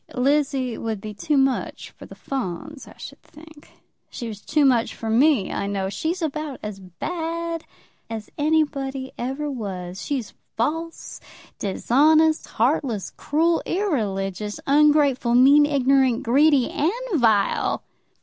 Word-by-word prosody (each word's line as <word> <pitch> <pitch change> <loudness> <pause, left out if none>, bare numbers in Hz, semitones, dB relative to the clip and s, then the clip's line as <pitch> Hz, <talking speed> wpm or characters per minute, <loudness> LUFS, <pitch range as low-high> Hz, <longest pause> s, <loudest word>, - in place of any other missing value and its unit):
"Lizzie 270 -2 +1
would 220 -2 -3
be 215 +1 -7
too 290 +8 -1
much 270 -1 0
for - - -13
the - - -12
Fawns, 270 - -5
I - - -15
should - - -10
think. 310 0 -16 0.4
She 235 - -6
was 210 -2 -8
too 300 -2 +2
much 245 -4 +2
for 225 -1 -4
me, 255 -3 +3
I 200 - -2
know. 195 -1 -2
She's 330 - -3
about 305 -2 -4
as 210 -2 -6
bad 330 - -4 0.4
as 220 -2 -6
anybody 285 -3 0
ever 270 +5 -3
was. 190 -6 -6
She's 265 -7 -3 0.2
false, 325 +7 -3 0.4
dishonest, 310 +10 +3
heartless, 235 - 0
cruel, 330 +3 +1
irreligious, 210 - -2
ungrateful, 285 -4 +3
mean, 280 +4 +6
ignorant, 270 -3 +2
greedy, 275 +2 +3
and 315 +4 +1 0.3
vile!" 215 -4 +2
270 Hz, 130 wpm, -23 LUFS, 225-305 Hz, 0.4 s, mean